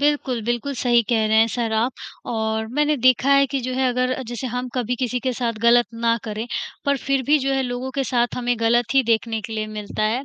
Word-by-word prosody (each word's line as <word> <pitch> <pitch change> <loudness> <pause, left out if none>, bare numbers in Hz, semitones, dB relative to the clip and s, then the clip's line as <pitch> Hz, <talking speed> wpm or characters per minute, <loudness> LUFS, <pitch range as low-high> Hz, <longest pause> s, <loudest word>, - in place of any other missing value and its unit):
बिल्कुल, 285 -4 +1
बिल्कुल 240 +4 -2
सही 240 -1 +3
कह 225 -3 +2
रहे 220 0 +2
हैं 225 - +6
सर 230 -2 -1
आप 230 +4 +1 0.4
और 220 0 -1
मैंने 300 0 +2
देखा 255 +2 +3
है 275 0 +5
कि 270 +1 -2
जो 255 +1 -4
है, 260 0 +1
अगर 255 +1 -1
जैसे 240 +2 -4
हम 250 +1 -3
कभी 250 0 -1
किसी 250 -1 -2
के 260 -2 -1
साथ 235 -1 -1
गलत 235 -1 +5
ना 230 0 +1
करें, 215 +1 -4 0.4
पर 280 0 +2
फिर 270 0 -1
भी 300 +1 +4
जो 275 0 -1
है 270 0 +1
लोगों 250 +1 -4
के 270 - +1
साथ 240 -1 0
हमें 245 0 0
गलत 235 +2 +2
ही 270 - +5
देखने 225 -1 0
के 225 +1 -8
लिए 215 -1 -2
मिलता 215 0 -5
है, 230 +6 0
245 Hz, 240 wpm, -22 LUFS, 230-260 Hz, 0.4 s, हैं